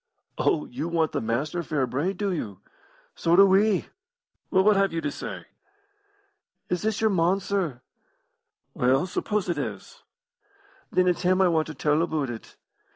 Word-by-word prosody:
"Oh, 75 - +1
you 140 +7 -5
want 165 -2 +1
the - - -2
Master 135 +10 -1
fair 150 -5 -1
brayed, 155 +10 -2
do 200 0 -1
you? 105 - -5 0.5
So 170 +1 +2
do 195 +2 +8
we. 195 0 +3 0.6
Well, 190 -1 +3
what 210 +1 +5
have 195 0 +2
you 165 - -2
to 150 -3 -2
say?" - - -7 1.2
"Is 180 - -1
this 220 0 -1
your 220 -1 +3
mon, 180 +1 +2
sir?" 180 -10 -2 0.9
"Well, 130 +6 +2
suppose 205 +2 -2
it 175 - -1
is?" - - -6 0.9
"Then 185 0 +3
it's 180 - +1
him 185 +1 +2
I 190 -2 +5
want 160 -2 +1
to 155 - -7
tell 150 +3 +1
aboot 155 -6 -1
it. 115 - -10
170 Hz, 165 wpm, -26 LUFS, 150-190 Hz, 1.2 s, do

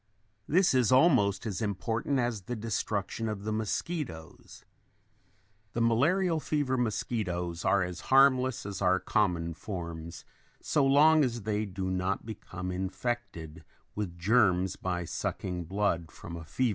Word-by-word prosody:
This 180 +2 +4
is 125 -3 +3
almost 130 - +4
as 105 -1 -3
important 110 +6 -1
as 120 -4 -1
the 120 +7 -5
destruction 110 0 -2
of 105 -2 -5
the 110 - -2
mosquitoes. 110 - -4 1.1
The 120 - -1
malarial 160 +10 +2
fever 145 -4 0
mosquitoes 95 -8 -2
are 100 0 +3
as 90 0 -5
harmless 130 -3 +4
as 100 -1 -5
our 95 -1 +3
common 90 -7 0
forms 85 -3 -7 0.3
so 150 - +1
long 150 +3 +6
as 120 -4 -2
they 105 0 -1
do 95 0 -3
not 95 +2 -1
become 95 -4 -6
infected 90 -4 -4 0.3
with 95 -5 -4
germs 95 -1 +3
by 90 -2 -3
sucking 90 +1 -3
blood 85 -3 -1
from 85 - -9
a 85 -1 -8
fever - - -23
patient. 130 -2 +2
105 Hz, 140 wpm, -29 LUFS, 90-125 Hz, 1.1 s, long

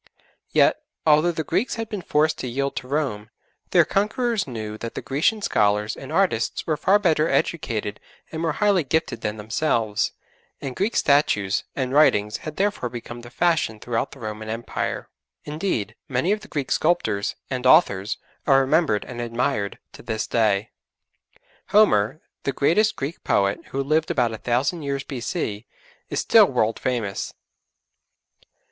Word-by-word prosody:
Yet, - - +3 0.2
although 155 +2 +5
the 160 -1 -3
Greeks 185 - 0
had 225 -1 -4
been 210 -3 -5
forced 155 -1 +1
to - - -3
yield 140 +3 -2
to 125 - -4
Rome, 130 -7 -2 0.4
their - - +5
conquerors 215 - 0
knew 110 -4 -5
that 115 - -6
the - - -3
Grecian 160 +10 +1
scholars 105 - +1
and 135 - -9
artists 165 -10 +1
were 155 - +1
far 195 +6 +4
better 165 -6 +2
educated 110 -10 -1 0.3
and 160 - -4
more 165 -2 0
highly 200 -2 +2
gifted 145 -5 -1
than 105 0 -3
themselves, 110 -1 0 0.5
and 135 -3 -5
Greek 205 +5 -1
statues 105 -9 +2
and 130 -1 -2
writings 105 -8 +4
had 155 -1 -7
therefore 200 -11 0
become 120 0 -8
the 120 - -11
fashion 155 -5 +1
throughout 120 +3 -2
the - - -12
Roman 110 -1 -6
Empire. 115 +2 -3 0.4
Indeed, 150 - -2 0.2
many 135 +8 +1
of 210 - +1
the 215 - -13
Greek 140 -4 -4
sculptors 110 - +1 0.2
and 130 -1 0
authors 110 - +4 0.3
are 135 -2 +6
remembered 135 - +2
and 120 - -6
admired 115 -3 -1 0.2
to - - -12
this 110 -1 -3
day. 110 -2 +1 1.0
Homer, 155 - +3 0.2
the 140 - -1
greatest 210 +10 +2
Greek 145 +4 -5
poet, 100 0 +1
who 135 +1 -2
lived 155 +3 +1
about 125 -8 +1
a 110 - -6
thousand 135 +8 0
years 140 -1 -2
B.C., 115 -5 -4 0.4
is - - -1
still - - +6
world 110 +1 0
famous. 115 -6 -2
135 Hz, 155 wpm, -23 LUFS, 110-160 Hz, 1.0 s, are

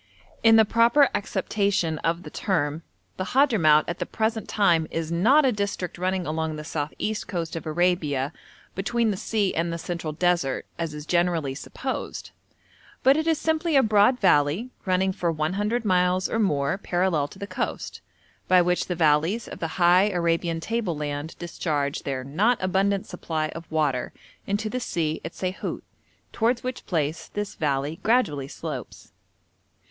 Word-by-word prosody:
In 225 -1 +6
the 220 -1 +7
proper 235 +6 +4
acceptation 200 -6 0
of 165 +2 -1
the - - -9
term, 155 -5 -1 0.4
the 185 - -1
Hadhramout 175 - +5
at 170 - -4
the - - -3
present 220 0 -2
time 175 -7 +3
is 165 0 -3
not 250 - +4
a 260 - +4
district 200 -5 -3
running 185 0 -1
along 160 0 -2
the 150 - -6
south 150 -1 -3
east 215 0 -2
coast 170 -3 -3
of 165 - -5
Arabia 155 -4 0 0.4
between 230 +3 0
the - - -2
sea 205 0 0
and 170 +1 -1
the 170 - -3
central 165 -1 -4
desert, 170 -4 0
as 165 -2 -3
is 150 0 -7
generally 170 -5 +1
supposed, 260 - -5 0.7
but 270 +1 +6
it 315 +1 -1
is 325 -1 +3
simply 320 0 0
a 270 - +6
broad 215 +4 +4
valley 180 - +2 0.2
running 185 +1 +2
for 175 -2 -1
100 205 +9 -1
miles 180 -1 +2
or 225 - -1
more 150 -4 +1
parallel 175 -6 0
to 170 - -14
the 200 - -5
coast, - - -4 0.5
by 185 0 +6
which 180 0 +1
the 180 - -2
valleys 165 +7 +2
of - - -8
the 165 - -2
high 180 +2 +5
Arabian 170 -2 0
table 210 -2 -2
land 145 +1 -4
discharge 150 -4 -2
their 130 -2 -3
not 200 - +2
abundant 195 +1 +1
supply 155 -2 -3
of 165 0 -9
water 150 -5 0 0.3
into 205 +2 -1
the 250 +4 -2
sea 160 -9 -2
at 165 - -6
Saihut, 185 +1 -4 0.5
towards 235 +2 +1
which 255 0 -5
place 155 -2 -1
this 205 -1 -4
valley 145 +1 -1
gradually 165 - +1
slopes. - - -7
180 Hz, 165 wpm, -25 LUFS, 155-210 Hz, 0.7 s, the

